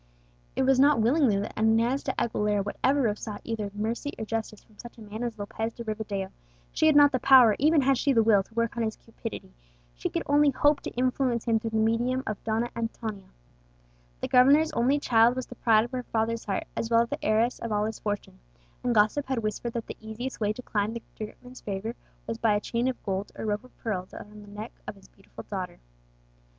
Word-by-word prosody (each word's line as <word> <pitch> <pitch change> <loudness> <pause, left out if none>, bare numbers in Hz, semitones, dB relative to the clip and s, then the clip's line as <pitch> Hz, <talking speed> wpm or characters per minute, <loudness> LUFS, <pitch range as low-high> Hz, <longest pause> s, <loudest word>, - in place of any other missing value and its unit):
It - - +1
was 265 0 +3
not 285 -1 +5
willingly 240 -1 +3
that 205 - -4
Inez 225 +5 +2
de 265 - -2
Aguilera 210 -3 0
would 205 - -4
ever 270 -2 +3
have 210 0 -2
sought 210 -2 -6
either 220 -3 -3
mercy 230 +7 -2
or 220 - -4
justice 220 -1 -4
from 215 - -26
such 240 -1 -11
a - - -13
man 215 +1 -7
as 235 -2 -3
Lopez 220 +2 -4
de 235 - -6
Rivadeo; 210 -3 -4 0.4
she 315 - +2
had 310 - +5
not 290 -1 +7
the 255 - 0
power, 245 -5 +7
even 305 +2 +4
had 270 -1 +2
she 280 - +2
the 230 -4 +4
will, 215 -3 +5
to 195 - -15
work 230 -1 0
on 235 - -2
his 220 -1 -1
cupidity; 225 - -9 0.4
she - - -3
could - - -2
only 290 +1 +4
hope 290 +2 +2
to - - -5
influence 250 -1 0
him 225 -2 +2
through 225 - -4
the 220 - -2
medium 235 +4 +1
of 215 -2 -5
Donna 225 +2 -1
Antonia. 225 -4 -5 0.9
The - - -1
governor's 280 +5 +5
only 260 +5 +2
child 235 -3 +4
was 255 - -3
the - - -10
pride 225 -2 +3
of 240 - -10
her 255 -1 -2
father's 230 -1 -2
heart, 200 - -1
as 225 - -2
well 230 0 +5
as 235 - -7
the - - -5
heiress 225 +3 +2
of 230 - -5
all 210 0 +1
his 220 0 -4
fortune; 205 - -4 0.4
and 245 -1 +1
gossip 215 +7 +3
had 255 -4 -1
whispered 215 +2 -3
that 230 -1 -3
the - - -8
easiest 220 +4 -6
way 210 -2 +1
to 250 +4 -7
climb 215 0 -1
to 235 - -5 0.2
the 215 - -2
great 210 - -15
man's 250 +1 -12
favour 205 +3 -4 0.3
was 225 0 -4
by 220 -3 +3
a - - +2
chain 235 +3 -1
of 260 - -3
gold 195 0 -2
or - - -5
rope 210 +1 -1
of 255 - -19
pearl 185 -5 -3
round 210 0 -11
the 205 - -14
neck 210 +3 -7 0.2
of - - -5
his 195 - -19
beautiful 195 - -13
daughter. 190 -3 -5
225 Hz, 235 wpm, -27 LUFS, 215-250 Hz, 0.9 s, not